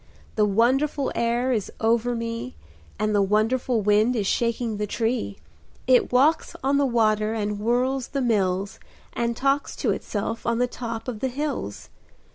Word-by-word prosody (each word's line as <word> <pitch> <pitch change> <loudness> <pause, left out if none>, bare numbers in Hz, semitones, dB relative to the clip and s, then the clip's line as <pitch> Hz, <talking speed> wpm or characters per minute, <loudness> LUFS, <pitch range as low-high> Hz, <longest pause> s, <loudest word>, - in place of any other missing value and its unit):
The 215 - +3
wonderful 260 +7 +1
air 240 +2 0
is 215 -6 -1
over 235 +2 +1
me, 230 - -4 0.4
And 215 0 0
the 205 - +3
wonderful 220 +4 +1
wind 210 +4 +3
is 210 -4 0
shaking 230 +1 0
the 210 0 -2
tree 225 - -2 0.5
It 255 -1 +4
walks 275 +6 +3
on 280 +1 +2
the 280 - +3
water, 215 -2 +2
and 210 -1 -2
whirls 250 +4 0
the 280 - -3
mills, 195 -5 0 0.3
And 235 0 -1
talks 275 +1 0
to - - 0
itself 225 +2 -3
on 235 -1 0
the 245 - +3
top 230 -2 -6
of 235 -4 -4
the 265 - 0
hills. 265 - -4
230 Hz, 160 wpm, -24 LUFS, 215-250 Hz, 0.5 s, It